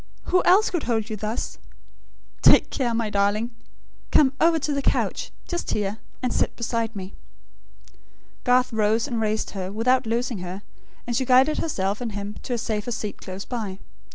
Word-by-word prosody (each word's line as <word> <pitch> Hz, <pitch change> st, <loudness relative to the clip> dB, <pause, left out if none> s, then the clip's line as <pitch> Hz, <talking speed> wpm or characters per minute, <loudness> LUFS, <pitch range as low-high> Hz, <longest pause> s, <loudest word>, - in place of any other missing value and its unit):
Who 365 Hz, 0 st, +3 dB
else 390 Hz, +4 st, +5 dB
could 345 Hz, -, 0 dB
hold 225 Hz, -1 st, 0 dB
you -, -, -1 dB
thus?... 215 Hz, +3 st, -4 dB, 0.8 s
Take -, -, +6 dB
care, 250 Hz, -4 st, 0 dB
my 225 Hz, -2 st, -1 dB
darling! 205 Hz, +4 st, +1 dB, 0.6 s
Come 270 Hz, -3 st, +5 dB
over 330 Hz, 0 st, +5 dB
to 295 Hz, -1 st, -1 dB
the 280 Hz, -, 0 dB
couch, -, -, 0 dB, 0.2 s
just 345 Hz, -1 st, -3 dB
here; 210 Hz, +1 st, -1 dB, 0.2 s
and 250 Hz, -, 0 dB
sit -, -, 0 dB
beside 230 Hz, -1 st, -2 dB
me." 190 Hz, -1 st, -6 dB, 1.3 s
Garth 250 Hz, -1 st, +3 dB
rose, 220 Hz, +3 st, +2 dB
and 235 Hz, -5 st, -2 dB
raised 215 Hz, 0 st, -1 dB
her, 190 Hz, -1 st, -4 dB
without 235 Hz, +3 st, +2 dB
loosing 235 Hz, -1 st, -1 dB
her; 185 Hz, +3 st, -6 dB, 0.4 s
and 240 Hz, -, -2 dB
she 260 Hz, -, +2 dB
guided 260 Hz, +4 st, +4 dB
herself 205 Hz, -8 st, -1 dB
and 230 Hz, -3 st, -3 dB
him 205 Hz, 0 st, -4 dB
to 250 Hz, -, -4 dB
a -, -, -2 dB
safer 220 Hz, 0 st, -2 dB
seat 215 Hz, -3 st, -4 dB
close 190 Hz, +1 st, -6 dB
by. 215 Hz, -6 st, -4 dB
225 Hz, 175 wpm, -24 LUFS, 210-255 Hz, 1.3 s, Take